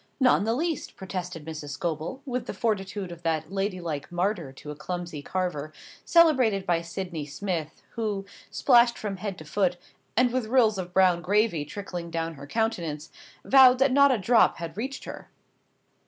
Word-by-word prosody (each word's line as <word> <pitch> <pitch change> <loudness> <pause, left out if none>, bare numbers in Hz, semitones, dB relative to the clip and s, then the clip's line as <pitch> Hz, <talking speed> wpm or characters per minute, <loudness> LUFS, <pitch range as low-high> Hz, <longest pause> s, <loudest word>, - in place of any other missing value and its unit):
"Not 260 -2 +5
in - - -2
the 225 +1 +1
least." 325 +3 -2
protested 180 -4 -6
Mrs. 155 -3 -6
Scobel, 170 - -3
with 250 -2 -3
the - - -5
fortitude 195 -4 -2
of 170 -1 -10
that 160 0 -1
ladylike 185 -7 -3
martyr 175 -4 -1
to 150 +2 -9
a - - -7
clumsy 170 0 -5
carver, 155 -3 -3 0.3
celebrated 260 - +4
by 170 -1 +1
Sydney 170 -3 -5
Smith, 160 0 -4
who, 210 -4 -3 0.2
splashed 240 -2 +4
from 200 -3 -4
head 195 -1 -5
to 155 - -10
foot, 180 +3 0 0.4
and 250 0 +4
with 255 -3 -1
rills 225 -4 +3
of 180 -1 -5
brown 180 -2 +4
gravy 200 -3 +1
trickling 175 0 -6
down 165 0 -3
her 140 -1 -11
countenance, 170 -8 -2 0.3
vowed 260 -2 +7
that 270 +1 +3
not 280 +1 +6
a 255 - +2
drop 225 +4 +4
had 170 -1 -6
reached 265 +6 -4
her. - - -9
190 Hz, 170 wpm, -27 LUFS, 165-225 Hz, 0.4 s, vowed